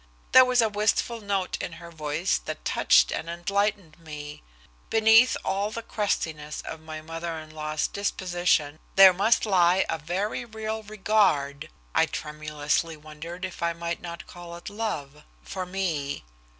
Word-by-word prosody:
There 260 - +9
was 250 -2 +3
a - - +3
wistful 215 +2 0
note 200 -2 -1
in - - -5
her 170 0 -11
voice 155 +3 -1
that - - -6
touched - - +4
and 165 - -3
enlightened 185 -1 -1
me. 150 -2 -8 0.5
Beneath 225 +2 +6
all 200 +2 0
the 230 +1 -6
crustiness 155 -9 -2
of 160 - -7
my 155 0 -8
mother 165 +1 -5
in 155 0 -9
law's 155 0 -2
disposition 175 -6 0 0.2
there 195 -1 +9
must 210 +6 +3
lie 185 -2 +4
a 165 - -1
very 185 +10 -2
real 220 -1 -4
regard 190 -9 +1 0.2
I - - +4
tremulously 150 +1 -2
wondered 155 +4 -7
if 185 - -8
I 170 0 +1
might 170 0 -4
not 170 -1 -7
call 175 -1 -10
it 170 - -8
love 155 -10 -4 0.2
for 185 - -5
me. 165 - -2
175 Hz, 150 wpm, -26 LUFS, 155-205 Hz, 0.5 s, There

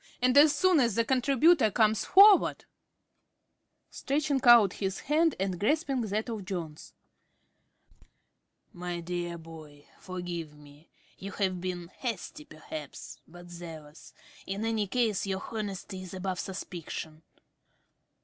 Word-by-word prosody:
And 250 +1 +2
as 295 +1 +7
soon 360 +2 +3
as 235 -6 +2
the 230 - +1
contributor 270 +1 +3
comes 215 -1 +2
forward 395 +1 +6
~Smith~ - - -25 1.2
(stretching 280 -1 -1
out 235 -6 +7
his 195 -1 -4
hand 315 +3 +2
and 190 -2 -2
grasping 275 - 0
that 215 +1 -2
of 220 -4 -5
Jones). 170 -5 -7 1.8
My 175 0 -5
dear 175 0 -4
boy, 155 -3 -13
forgive 175 -4 -6
me. 145 +2 -18 0.3
You 195 +1 -7
have 185 -3 -1
been 175 -2 -5
hasty, 205 - -6
perhaps, 155 -2 -9
but 175 +1 -14
zealous. 165 -3 -11 0.3
In 200 +3 -3
any 220 -2 0
case, 215 -3 0
your 190 0 -3
honesty 200 -3 -5
is 185 0 -9
above 185 -1 -3
suspicion. 170 -4 -7
195 Hz, 125 wpm, -29 LUFS, 175-240 Hz, 1.8 s, as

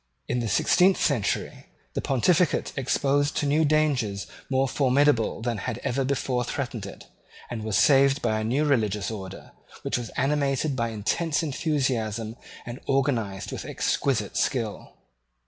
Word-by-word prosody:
In 125 - 0
the 115 - -2
sixteenth 180 - +4
century 130 -10 -1 0.3
the - - -2
Pontificate 165 +6 +2
exposed 140 +2 +1
to - - 0
new 150 +3 +3
dangers 145 -10 +1 0.2
more 135 0 +2
formidable 130 -4 +2
than 115 -3 -1
had 115 - -3
ever 135 +2 0
before 130 -2 -1
threatened 120 -5 -4
it, 95 - -11 0.5
was 110 -3 -1
saved 140 0 +5
by 110 -4 0
a - - -2
new 130 +7 +1
religious 105 -8 +1
order, 95 -4 -8 0.3
which - - -1
was 115 -2 -6
animated 140 0 +1
by 115 -2 -1
intense 145 +10 -1
enthusiasm 125 - -1 0.3
and 120 +2 -7
organized 125 -8 0
with - - -5
exquisite 110 -8 -1
skill. 115 -6 -1
130 Hz, 140 wpm, -26 LUFS, 110-145 Hz, 0.5 s, saved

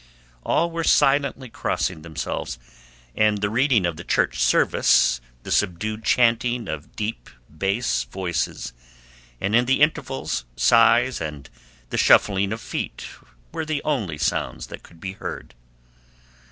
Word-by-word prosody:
All 170 +1 +1
were 165 0 -2
silently 140 -3 +2
crossing 95 -6 -2
themselves, 80 -6 -4 0.6
and 105 -1 +3
the 105 0 -1
reading 125 -4 +3
of 85 -2 -2
the - - -7
church - - 0
service, - - +3 0.2
the - - -7
subdued 105 +3 0
chanting 120 -1 +2
of 80 0 -7
deep 110 +1 -4 0.3
bass 95 - 0
voices, 85 -4 -3 0.7
and 100 +3 0
in 120 +1 +4
the 135 +2 +2
intervals 135 - 0
sighs 115 - +4
and 75 -4 -6 0.4
the - - -1
shuffling 100 0 +4
of 110 +1 -4
feet - - -5 0.5
were - - -3
the 155 -2 -3
only 110 - -1
sounds 75 - -2
that - - -8
could 85 - -18
be 95 +2 -5
heard. 95 - -7
110 Hz, 135 wpm, -23 LUFS, 85-125 Hz, 0.7 s, in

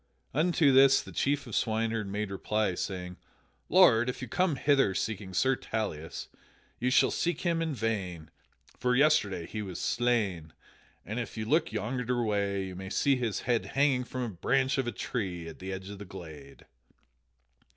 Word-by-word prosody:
Unto 160 -1 +3
this 135 0 +7
the - - -11
chief 145 0 0
swineherd 110 -1 0
made 100 0 -3
reply, 105 0 0
saying: 90 0 -5 0.5
"Lord, 125 -10 +6
if 125 - -4
you 125 - -5
come 180 +5 +1
hither 135 -8 +3
seeking 100 -3 -3
Sir 130 +9 +2
Tauleas, 100 -11 -4 0.5
you 125 - +1
shall 130 - +4
seek 175 0 -1
him 170 -2 0
in 160 -3 -1
vain. 95 -8 -3 0.5
For 125 0 +2
yesterday 130 - +3
he 105 - -5
was 95 -4 -6
slain, 100 -10 0 0.5
and 110 +4 -4
if 115 - -5
you 110 - -2
look 155 +9 +2
yonder 120 +2 -1
way 100 -2 0
you 95 -1 -7
may 95 +1 -7
see 140 +6 +2
his 120 -5 -2
head 120 -2 +1
hanging 135 -3 +3
from 125 0 -4
a 120 - -2
branch 130 +8 +1
of 130 - 0
a - - 0
tree 90 -11 -4
at 80 - -10
the 95 +1 -5
edge 95 +1 -6
of 100 - -9
the 105 - -7
glade." 80 -7 -11
110 Hz, 170 wpm, -29 LUFS, 95-130 Hz, 0.5 s, this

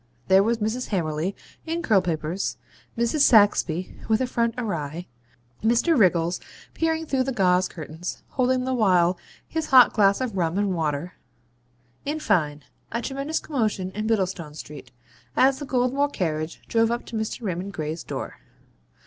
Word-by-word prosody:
There 190 +1 +7
was 230 +3 +1
Mrs. 225 +4 -2
Hammerly 165 -1 -1 0.3
in 335 +1 -2
curl 210 - +4
papers; 170 +1 -2 0.4
Mrs. 235 +6 +1
Saxby 205 - +4
with 220 0 +3
her 260 - +1
front 235 -2 0
awry; 170 - -3 0.6
Mr. 240 +9 +3
Wriggles 175 - +3 0.3
peering 320 0 0
through 270 -4 0
the 265 +1 -1
gauze 185 -5 +3
curtains, 160 +2 -7
holding 255 0 +1
the 260 - -1
while 180 -6 +3 0.3
his 320 -1 -3
hot 255 -3 +7
glass 200 -2 +4
of 250 -6 -3
rum 170 -1 0
and 200 -2 +1
water 160 0 -2 0.9
in 300 +2 -2
fine, 150 - 0 0.3
a 235 - -1
tremendous 275 +4 -2
commotion 215 -10 -2
in 215 +2 -3
Bittlestone 185 -8 -1
Street, 145 -5 -10 0.5
as 265 +1 +4
the 290 - -6
Goldmore 265 +3 +1
carriage 155 - -3
drove 225 0 +2
up 240 +1 -2
to - - -8
Mr. 220 +2 -3
Raymond 190 0 -3
Gray's 155 -2 -4
door. - - -6
205 Hz, 155 wpm, -24 LUFS, 175-250 Hz, 0.9 s, There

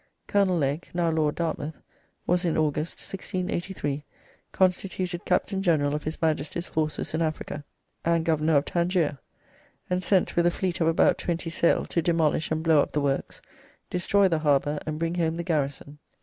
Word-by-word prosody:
Colonel 195 -3 +2
Legge 145 +2 -1
(now 170 -2 +2
Lord 155 -2 +1
Dartmouth) 160 -2 -3 0.5
was 180 +1 +2
in 170 -3 +1
August, 155 +1 0
1683, 180 -6 -3 0.5
constituted 185 -1 0
Captain 190 +1 +1
General 150 -6 +2
of 150 - -3
his 155 +1 -3
Majesty's 160 +1 -1
forces 155 -1 -2
in 160 - 0
Africa, 155 -2 -3 0.4
and 165 -1 +2
Governor 160 -1 +3
of 140 - +1
Tangier, 170 -5 0 0.7
and 180 0 +1
sent 190 +1 +2
with 170 0 +4
a - - +6
fleet 180 0 -2
of 160 - +3
about 165 - +3
twenty 170 -1 -2
sail 170 - +2
to 170 - 0
demolish 160 -2 +1
and 160 0 -1
blow 160 -2 +5
up - - -3
the 150 - +1
works, 140 -1 -2 0.5
destroy 195 +2 +3
the 165 -4 +1
harbour, 145 -1 +2
and 155 0 -2
bring 165 +1 -1
home 165 -2 0
the 170 - -2
garrison. 145 -3 -2
165 Hz, 170 wpm, -26 LUFS, 150-175 Hz, 0.7 s, a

